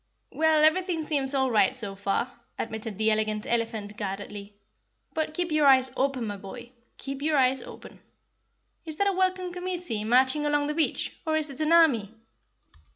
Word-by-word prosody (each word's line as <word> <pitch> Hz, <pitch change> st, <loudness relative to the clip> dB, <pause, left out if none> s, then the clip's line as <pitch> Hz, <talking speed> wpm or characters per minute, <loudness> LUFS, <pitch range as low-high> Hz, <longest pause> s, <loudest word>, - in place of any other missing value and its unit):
"Well, 315 Hz, -1 st, +3 dB
everything 340 Hz, +1 st, +2 dB
seems 285 Hz, -3 st, 0 dB
all 265 Hz, -1 st, +1 dB
right 215 Hz, +3 st, +3 dB
so 215 Hz, -6 st, -5 dB
far," 200 Hz, +5 st, -2 dB, 0.2 s
admitted 220 Hz, -2 st, -5 dB
the 220 Hz, 0 st, +2 dB
Elegant 215 Hz, 0 st, 0 dB
Elephant 225 Hz, -3 st, -2 dB
guardedly. 205 Hz, 0 st, -6 dB, 0.6 s
"But 315 Hz, -1 st, -2 dB
keep 350 Hz, -2 st, -2 dB
your 305 Hz, -2 st, +3 dB
eyes 260 Hz, -1 st, +5 dB
open, 270 Hz, -3 st, 0 dB
my 205 Hz, -1 st, -4 dB
boy 235 Hz, +5 st, -10 dB, 0.3 s
keep 275 Hz, 0 st, -6 dB
your 305 Hz, 0 st, +1 dB
eyes 260 Hz, 0 st, +3 dB
open. -, -, -12 dB, 0.8 s
Is 315 Hz, -2 st, -5 dB
that 400 Hz, -, +1 dB
a 400 Hz, -, +2 dB
welcome 370 Hz, -1 st, 0 dB
committee 355 Hz, -11 st, -3 dB
marching 260 Hz, +6 st, +3 dB
along 290 Hz, -1 st, +1 dB
the 300 Hz, -, -2 dB
beach, 315 Hz, 0 st, -1 dB
or 315 Hz, -2 st, 0 dB
is 305 Hz, -2 st, -2 dB
it 275 Hz, +3 st, -7 dB
an 310 Hz, +1 st, +1 dB
army?" 250 Hz, -11 st, +4 dB
270 Hz, 170 wpm, -27 LUFS, 220-315 Hz, 0.8 s, eyes